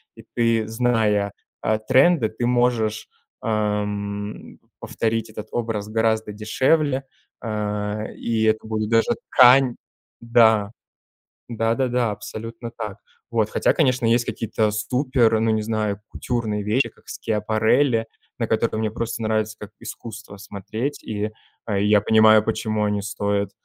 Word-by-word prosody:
и - - -13
ты, 115 -2 +2
зная, 110 -3 +1 0.3
э, 110 0 +1
тренды, 135 -2 +4
ты 120 +2 -3
можешь, 120 -3 +1 0.4
эм, 105 -2 -3 0.2
повторить 115 -1 -2
этот 110 0 -8
образ 110 -3 -2
гораздо 110 -1 0
дешевле. 130 +6 +1 0.4
Э, 105 -1 -3
и 115 -1 -1
это 110 0 +1
будет 110 -1 -2
даже 115 - +3 0.2
ткань 125 0 +6 0.5
Да, 110 -3 +4 0.8
да-да-да, 120 +1 0
абсолютно 115 +3 -7
так. 105 -2 -6 0.3
Вот, 110 -2 +1
хотя, - - +2
конечно, 130 -5 +2
есть 120 +1 +3
какие-то 110 -1 -1
супер, 125 0 +1
ну, 110 0 +2
не 110 0 +1
знаю, 105 -2 -2
кутюрные 110 -4 -2
вещи, 110 +6 +1
как - - -26
Schiaparelli, 110 +3 +1 0.3
на 115 - 0
которые 110 0 0
мне 110 -1 0
просто 115 +1 -4
нравится 110 0 0
как 105 - -8
искусство 110 -2 -9
смотреть. 110 +7 -5
И, 105 0 -3 0.4
э, 100 -2 0
я 105 0 +4
понимаю, 110 0 +6
почему 110 -1 -1
они 105 -1 -1
стоят, 100 0 -1
110 Hz, 130 wpm, -22 LUFS, 105-115 Hz, 0.8 s, ткань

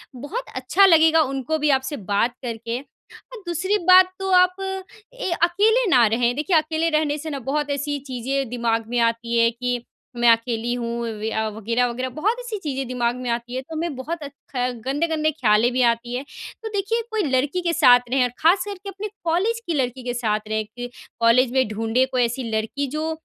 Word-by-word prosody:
बहुत 315 - -5
अच्छा 290 +10 +4
लगेगा 325 -2 +6
उनको 275 +2 -1
भी 300 0 +1
आपसे 265 +2 -5
बात 230 +4 +2
करके। 230 0 -4
और 460 +9 -16
दूसरी 375 +5 0
बात 370 0 +7
तो 385 - -3
आप 365 0 -1 0.6
ए - - -4
अकेले 435 +8 +3
ना 245 -8 +6
रहें। 240 +2 +1
देखिए, 320 +3 +2
अकेले 315 +1 0
रहने 305 -2 +1
से 315 +2 -6
ना 280 -2 -4
बहुत 285 +3 -2
ऐसी 285 0 -2
चीज़ें 260 +1 -2
दिमाग 230 -2 -1
में 245 0 0
आती 230 0 0
है 230 0 +5
कि 245 0 -3 0.3
मैं 240 0 +4
अकेली 230 +1 0
हूँ 235 -1 -3
वया 220 -1 -2
वग़ैरह-वग़ैरह, 235 +4 -1
बहुत 405 - -1
ऐसी 475 -4 -5
चीज़ें 270 -3 -3
दिमाग 245 -1 -1
में 250 -1 -5
आती 235 +1 -3
हैं। 260 - -3
तो 320 +4 -9
हमें 320 -2 -3
बहुत 320 +6 -5
अच 280 - -7 0.2
ख 250 0 +1 0.2
गंदे-गंदे 310 +2 0
ख़्यालें 235 -3 +2
भी 255 - +1
आती 235 +1 -1
हैं। 260 - -3 0.4
तो - - -3
देखिए, 405 +4 0
कोई 435 -2 0
लड़की 280 +5 0
के 340 -1 0
साथ 250 -7 +7
रहें, 260 0 +2
और 245 - +1
ख़ास 355 +4 +4
करके 400 -1 -7
अपने 395 +2 -6 0.2
कॉलेज 380 +8 0
की 335 - 0
लड़की 255 -2 -2
के 245 0 -3
साथ 215 -3 -1
रहें, 220 0 -1
कि 245 +3 -8 0.3
कॉलेज 235 +2 +4
में 260 -2 +2
ढूँढ़े 225 +4 +1
कोई 250 -1 +2
ऐसी 240 +2 -2
लड़की 220 +6 -2
जो 315 +1 -1
260 Hz, 200 wpm, -22 LUFS, 235-325 Hz, 0.6 s, बात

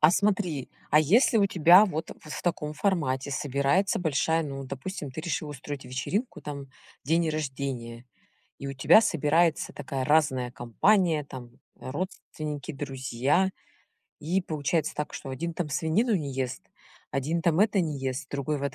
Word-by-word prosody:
А 155 - +8
смотри, 185 -7 0 0.2
а 150 - +6
если 220 - +4
у 200 - +4
тебя 180 +2 +7
вот 160 -5 -3
в 155 - -11
в - - -8
таком 160 -4 -1
формате 150 -7 0
собирается 140 +8 +1
большая, 160 0 +1
ну, 135 -2 -5
допустим, 140 +3 -6
ты 130 - -6
решила 155 -2 -3
устроить 145 -1 -7
вечеринку, 135 - -3
там 140 -2 -6 0.4
день 165 +3 +2
рождения, 130 -5 -4 0.5
и 140 - -5
у - - -3
тебя 135 +10 +6
собирается 165 -4 +2
такая 135 -2 -4
разная 130 -4 +2
компания, 160 - +2
там 125 -3 -9 0.3
родственники, 150 -1 -5
друзья. 135 +5 0 0.7
И 175 +6 0
получается 155 0 -1
так, 150 0 -4
что - - -7
один 170 +6 -3
там 170 -3 -2
свинину 170 - +1
не 145 -5 -4
ест, 130 -1 -3 0.5
один 155 +5 -1
там 170 +1 +2
это 210 -2 +4
не 155 -5 -2
ест, 130 0 -3
другой 140 +1 -2
вот 140 -2 -3
150 Hz, 155 wpm, -27 LUFS, 135-170 Hz, 0.7 s, А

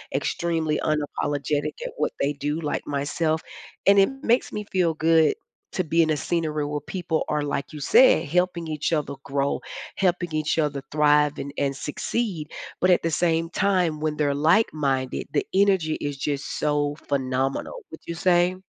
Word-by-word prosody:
extremely 165 -3 0
unapologetic 145 0 -1
at - - -4
what 150 - 0
they 140 +1 +1
do, 145 +3 -2
like 145 -2 -2
myself. 155 +3 -1 0.4
And 200 0 +7
it 195 - +5
makes 240 +2 +2
me 210 - -3
feel 170 -4 +2
good 160 -1 +4 0.4
to 185 - 0
be 165 +1 +2
in 160 - +2
a 150 - +1
scenery 155 -2 -1
where 150 0 -2
people 170 -1 -2
are, 150 -1 0
like 145 0 -3
you 150 - -7
said, 160 - +5
helping 175 +1 0
each 155 +1 -2
other 150 -3 0
grow, 140 0 -1 0.4
helping 175 -3 +1
each 155 +1 0
other 145 -3 0
thrive 150 -1 +3
and 140 0 -6
and 140 -1 0
succeed. 160 - -3 0.3
But 185 - +4
at 180 - +4
the 165 - 0
same 165 0 +1
time, 180 -6 +1
when 155 -1 -2
they're 145 -2 +1
like-minded, 145 - +1
the 145 - +1
energy 190 -5 +3
is 145 -1 -3
just 140 0 -3
so 145 -1 0
phenomenal. 135 -1 -1
Would 160 - -9
you 170 - -4
say? 175 +1 +3
155 Hz, 170 wpm, -24 LUFS, 145-170 Hz, 0.4 s, And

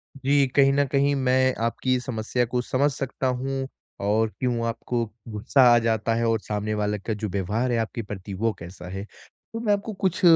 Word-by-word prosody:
जी, 140 +1 +3
कहीं 135 -1 +6
न 140 +1 +3
कहीं 140 +1 +2
मैं 130 -1 +3
आपकी 130 +2 0
समस्या 120 0 -1
को 125 +1 -1
समझ 135 +4 +1
सकता 135 -1 -3
हूँ, 135 +1 -2 0.3
और 110 +3 +2
क्यों 120 -2 0
आपको 115 +1 -2 0.3
गुस्सा 110 +5 +2
आ - - +6
जाता 115 0 +1
है, 115 0 +1
और 115 -1 +2
सामने 105 +1 -3
वाले 105 0 0
का 110 +3 -3
जो 105 0 -3
व्यवहार 105 +6 -1
है, 120 - +2
आपके 115 +1 -2
प्रति 100 -2 -7
वो 115 +4 0
कैसा 90 +1 -9
है? 95 +2 -5 0.5
तो 225 - -3
मैं 220 -3 +2
आपको 205 +2 -2
कुछ 190 -2 -1
120 Hz, 195 wpm, -25 LUFS, 110-135 Hz, 0.5 s, कहीं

